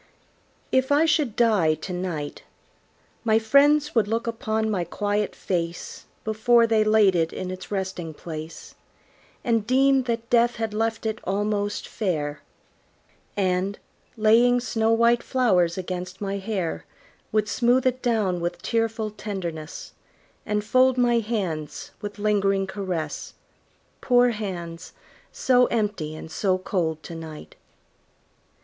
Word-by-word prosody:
If 260 +1 +2
I 295 +3 +5
should 300 -8 +1
die 205 -10 +3
to 170 +5 -7
night, 175 -5 -4 0.8
My 220 -2 +4
friends 285 +6 +4
would 225 -4 +3
look 225 +2 -1
upon 220 -2 -1
my 185 -4 0
quiet 205 +4 -2
face 170 -2 -4 0.2
Before 230 +2 +4
they 220 -1 +3
laid 215 -3 +4
it 165 -1 +1
in 185 0 -5
its 185 0 -8
resting 190 -5 -4
place, 160 0 -8 0.7
And 230 -3 +1
deem 270 +1 +4
that 230 -1 -2
death 240 0 +4
had 225 -2 -3
left 225 +1 -1
it 220 0 -2
almost 205 +1 -1
fair; 150 -8 -2 1.0
And, 190 +1 0 0.4
laying 235 +3 +5
snow 225 -2 0
white 235 +1 +4
flowers 190 -11 +2
against 185 0 -5
my 200 -1 -3
hair. 195 -4 -3 0.5
Would 215 -1 +1
smooth 245 +4 +2
it 255 0 +1
down 215 -7 +1
with 175 +1 -3
tearful 225 -2 -1
tenderness, 175 -7 -6 0.6
And 210 0 0
fold 255 +3 +3
my 240 -1 +3
hands 190 -10 -3
with 205 -1 -6
lingering 200 -2 +1
caress 190 -4 -4 0.7
Poor 245 -1 +4
hands, 180 -6 -6 0.4
so 250 -1 +3
empty 205 -9 -2
and 160 0 -9
so 185 0 +1
cold 165 -4 -2
to 170 - -8
night! 160 -2 -9
210 Hz, 130 wpm, -24 LUFS, 180-230 Hz, 1.0 s, I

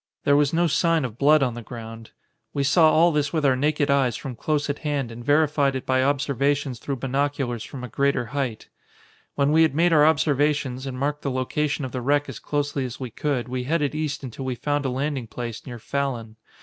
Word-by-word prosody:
There 140 - +4
was 145 -1 +3
no 170 +1 +2
sign 165 -1 +2
of 120 -2 -7
blood 150 +1 +5
on 125 -3 0
the 120 - -7
ground. 115 -1 -9 0.5
We 140 - +1
saw 160 +3 +5
all 170 +2 +5
this 150 -2 0
with 155 -3 0
our 135 -2 +4
naked 145 +1 +1
eyes 135 -4 +2
from 135 -4 -6
close 150 +5 -1
at 145 0 -3
hand 145 -6 -2
and 115 +1 -9
verified 145 -1 +2
it 130 - -4
by 130 0 +2
observations 140 -1 0
through 140 - -3
binoculars 135 -2 -2
from 130 -2 -8
a - - -4
greater 140 +1 0
height. 130 -6 -3 0.7
"When 140 0 +2
we 160 +1 +5
had 160 -4 +3
made 170 +2 +3
our 150 -1 +6
observations 145 -3 +1
and 130 -1 -5
marked 145 +2 -1
the 140 - -2
location 140 +3 -1
of 130 - -6
the 130 - -4
wreck 145 +3 +1
as 130 -5 -7
closely 145 -2 -2
as 125 -2 -6
we 130 -3 -5
could, 135 -1 -2
we 125 0 -3
headed 150 0 0
east 155 -2 -3
until 130 +1 -6
we 130 -1 -2
found 145 +3 -1
a - - +1
landing 135 -1 -2
place 115 0 -6
near 120 -2 -6
Fallon. 120 -3 -3
140 Hz, 220 wpm, -24 LUFS, 125-150 Hz, 0.7 s, our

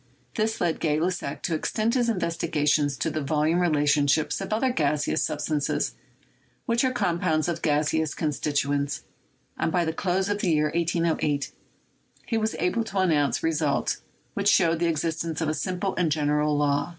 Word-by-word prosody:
This 220 +1 -1
led 170 -2 0
Gay 150 -2 +1
Lussac 180 +2 -2
to 170 - -1
extend 215 +8 0
his 245 -2 +2
investigations 155 -7 0
to - - -1
the 155 - -2
volume 155 +4 +1
relations 150 -4 +3
of 155 - -2 0.2
other 250 +4 +1
gaseous 150 - 0
substances 150 -2 -1 0.7
which 235 +1 +1
are 260 - +3
compounds 170 -8 0
of 170 -1 -2
gaseous 155 0 +1
constituents, 145 -2 -1 0.6
and - - 0
by 175 0 +1
the 160 - -1
close 185 +2 0
of 205 0 -1
the 190 - 0
year 150 -1 +2
1808 165 -3 0 0.7
he 230 - -2
was 220 0 -1
able 180 +7 0
to 200 - -6
announce 150 -9 +2
results 155 -3 0 0.3
which - - -1
showed 165 -1 +3
the 170 - +1
existence 165 0 -2
of 160 -2 0
a - - 0
simple 185 +4 -2
and 170 -4 +1
general 150 0 +1
law. 145 +1 +1
160 Hz, 165 wpm, -26 LUFS, 150-180 Hz, 0.7 s, relations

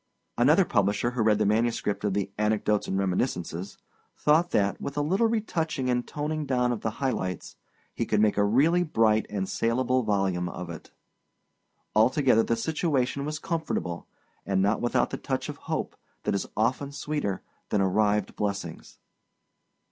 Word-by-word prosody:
Another - - +5
publisher 105 +4 +1
who 125 -2 -2
read 110 -1 +4
the 105 - +1
manuscript 110 -1 0
of 100 -2 0
the 100 -1 -1
Anecdotes 105 -1 +1
and 95 - -1
Reminiscences 90 -2 -2 0.4
thought 160 +4 +3
that, 100 - +1
with 140 - -5
a - - +2
little 190 +9 +2
retouching 165 - -1
and 125 0 -1
toning 150 0 -3
down 125 -2 +1
of 115 - -3
the 110 - 0 0.2
high 130 - +3
lights, 90 -6 -4 0.4
he - - -2
could 105 - +2
make 105 -1 +3
a 100 - +3
really 145 +12 +3
bright 110 -9 +2
and 95 -2 -2
salable 125 +4 +1
volume 95 -5 0
of 90 0 -6
it. 80 - -10 1.1
Altogether, 125 +1 +4
the 115 - 0
situation 140 +1 0
was 150 +1 -3
comfortable, 160 - -3 0.4
and 95 -1 0
not 100 +3 +2
without 120 - +1
the - - -3
touch - - -3
of - - -6
hope - - -4 0.3
that - - 0
is 100 - -1
often 130 +6 0
sweeter 140 -8 -3 0.3
than 105 - +1
arrived 105 +2 +1
blessings. 100 -5 -4
110 Hz, 165 wpm, -27 LUFS, 100-140 Hz, 1.1 s, Another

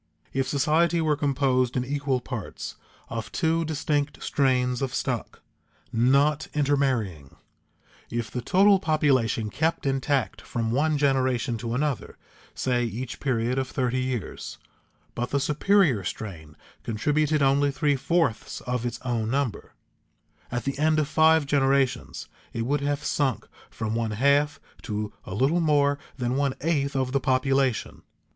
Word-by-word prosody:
If 135 0 0
society 155 +5 +2
were 155 -2 +2
composed 135 -3 +1
in 125 - 0
equal 140 -2 -1
parts 120 -5 -6 0.3
of 110 -3 -5
two 165 +10 +1
distinct 145 -2 -1
strains 125 -2 +1
of 135 -2 -2
stock, - - -3 0.5
not 140 +6 +3
intermarrying; 130 - 0 0.7
if 120 -1 -3
the 125 - -3
total 195 - +4
population 130 - +1
kept 160 0 0
intact 135 0 0
from 115 -1 -3
one 150 +4 +2
generation 130 -3 +1
to 115 +1 -3
another 145 -1 -2 0.4
(say 125 -2 0
each 120 +2 -4
period 125 -1 0
of 130 - -2
thirty 130 -1 -1
years), 130 -6 -4 0.6
but 120 +1 -3
the 140 - +1
superior 150 - +3
strain 85 -6 -6 0.2
contributed 150 +6 +1
only 140 +1 +3
three 145 +1 +1
fourths 165 -4 0
of 125 -1 -2
its 120 - -5
own 115 -3 -1
number, 135 -3 -2 0.8
at 125 0 -2
the 140 0 -3
end 155 +1 +3
of 155 -2 +1
five 160 0 +4
generations 135 -2 +1 0.3
it 115 - -2
would 140 +4 0
have 145 0 -1
sunk 135 -6 0 0.2
from 110 -1 -4
one 115 -1 -1
half 140 +3 +3 0.2
to 105 -2 -4
a 95 - -6
little 140 +10 +2
more 145 -2 +3 0.2
than 125 0 -1
one 140 -1 0
eighth 140 -3 0
of 130 -1 0
the 140 - +2
population. 130 -2 +1
135 Hz, 140 wpm, -26 LUFS, 120-145 Hz, 0.8 s, total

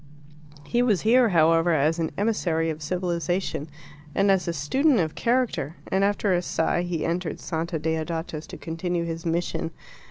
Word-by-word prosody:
He 240 - +1
was 215 -8 +2
here, 240 +2 +5
however, 165 -1 +4
as 155 +3 +2
an 160 - 0
emissary 170 -7 +1
of 155 0 -7
civilization 175 -1 -2 0.5
and 195 0 +4
as 190 -2 +1
a - - +1
student 255 - +2
of 160 -3 0
character, 235 - 0 0.2
and, 190 +1 +2
after 200 -1 +2
a 175 - +2
sigh, 175 0 0
he 175 -3 -2
entered 170 -1 -2
Santa 165 +1 -3
Deodata's 160 0 -3
to - - -8
continue 170 +1 -3
his 165 +1 -4
mission. 165 0 -1
170 Hz, 160 wpm, -25 LUFS, 160-195 Hz, 0.5 s, here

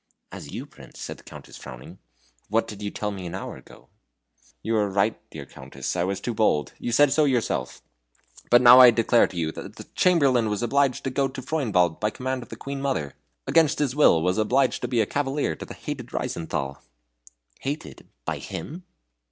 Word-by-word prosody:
"As - - -9
you, - - -6
Prince?" - - -15
said - - -6
the - - -18
Countess, - - -12
frowning, 65 0 -11 0.5
"what 115 +2 +1
did 105 -1 -9
you 105 - -2
tell 105 +1 -3
me 95 -3 -6
an 85 - -6
hour 95 - -6
ago?" - - -17 0.8
"You 115 - 0
are 105 -1 +1
right, 100 +3 +1
dear 75 -3 -8
Countess, 65 +4 -6
I 85 - +1
was 95 0 -2
too 120 +4 -3
bold. 90 - +1
You 120 - -3
said 140 +3 +5
so 155 +1 +3
yourself. 115 - -1 0.7
But 120 +1 +6
now 125 +1 +10
I 125 -1 +11
declare 115 0 +3
to 90 - -10
you 80 -2 -1
the - - -9
Chamberlain 135 -11 +3
was 105 +2 -2
obliged 135 +1 +1
to 135 - -2
go 135 +1 +1
to 130 0 -8
Freudenwald 105 - +1
by 105 - +1
command 130 +3 -3
of 120 - -12
the - - -7
Queen 140 0 -6
mother 80 - -2 0.3
against 165 -3 +3
his 140 -3 0
will 85 - +5
was 90 +4 +1
obliged 130 +4 +2
to 125 - -2
be 120 -2 +1
cavalier 140 - -1
to - - -8
the - - -10
hated - - -6
Reizenthal 70 -4 -3 0.4
" - - -27
"Hated 145 +4 -6 0.2
by - - -3
him?" 165 - -7
115 Hz, 200 wpm, -25 LUFS, 90-135 Hz, 0.8 s, I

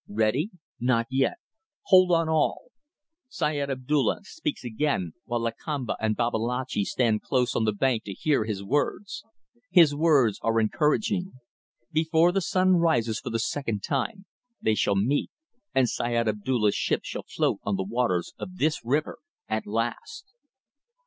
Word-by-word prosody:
Ready? 110 - +1 0.3
Not 120 -1 +2
yet. 135 - +1 0.5
Hold 185 -2 +5
on 165 -1 +3
all! 160 +9 0 0.6
Syed 145 - -1
Abdulla 135 +2 0
speaks 300 - -5
again, 120 - -1
while 120 0 -2
Lakamba 120 +3 -3
and 110 -1 +1
Babalatchi 120 0 -1
stand 115 -3 +1
close 125 -2 0
on 110 - +1
the 110 - +2
bank 115 +2 0
to 100 - -5
hear 140 +1 +1
his 105 -3 -4
words. 145 - -2 0.5
His 165 -5 +6
words 145 -8 +3
are 115 0 +2
encouraging. 180 - 0 0.6
Before 160 +2 +3
the 195 +2 0
sun 185 +1 +3
rises 120 -10 +1
for - - -6
the 115 - -1
second 115 -3 -2
time 195 - -2 0.3
they 110 - +1
shall 100 -1 +1
meet, 120 +9 +1 0.5
and 130 -2 +4
Syed 120 0 -1
Abdulla's 105 0 +1
ship - - 0
shall - - -5
float - - -1
on 100 - -1
the 95 - -1
waters 105 -3 -1
of 185 0 -7
this 155 -1 0
river 145 +6 -1 0.3
at - - -2
last! 450 -5 -4
130 Hz, 150 wpm, -26 LUFS, 110-160 Hz, 0.6 s, His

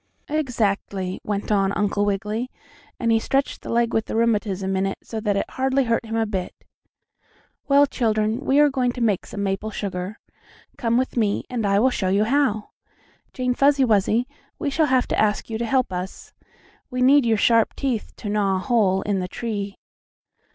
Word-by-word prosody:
"Exactly," 205 -10 -1
went 205 0 -3
on 195 -2 +2
Uncle 205 0 0
Wiggily, 210 +4 -2 0.5
and 230 -1 +1
he 225 - +4
stretched 275 +4 -1
the - - -9
leg 235 0 +1
with 220 - +1
the - - -4
rheumatism 205 -4 0
in 195 +1 0
so 225 - -5
that 210 -2 0
it - - -1
hardly 265 +1 +1
hurt 230 -1 0
him 225 - -3
a 225 0 +1
bit. 190 -4 -4 1.1
"Well, 285 0 +6
children, 220 -3 0
we 275 -1 +2
are 295 -1 +5
going 250 -2 0
to 250 - -7
make 210 -5 +1
some 200 -1 -4
maple 195 +2 -2
sugar. 195 -1 -4 0.6
Come 235 -1 0
with 260 0 -1
me, 210 -3 +1
and 230 -4 -1
I 200 0 +3
will 255 +5 +4
show 190 -6 -1
you 200 +3 +3
how. 225 -3 +1 0.6
Jane 250 -1 -1
Fuzzy 275 +1 +4
Wuzzy, 220 +2 +2 0.3
we 290 -4 -2
shall 310 +2 +2
have 260 -2 +2
to - - 0
ask 215 +1 0
you 220 - -3
to 235 - -1
help 255 -4 +1
us. 180 +1 -6 0.6
We 250 -1 -1
need 280 +2 +6
your 225 -1 +3
sharp 230 +1 +3
teeth 255 -6 -2
to - - -8
gnaw 205 -2 +1
a - - +1
hole 195 -2 +1
in 205 -2 0
the 180 - -3
tree." 205 -1 -4
220 Hz, 190 wpm, -23 LUFS, 200-250 Hz, 1.1 s, Well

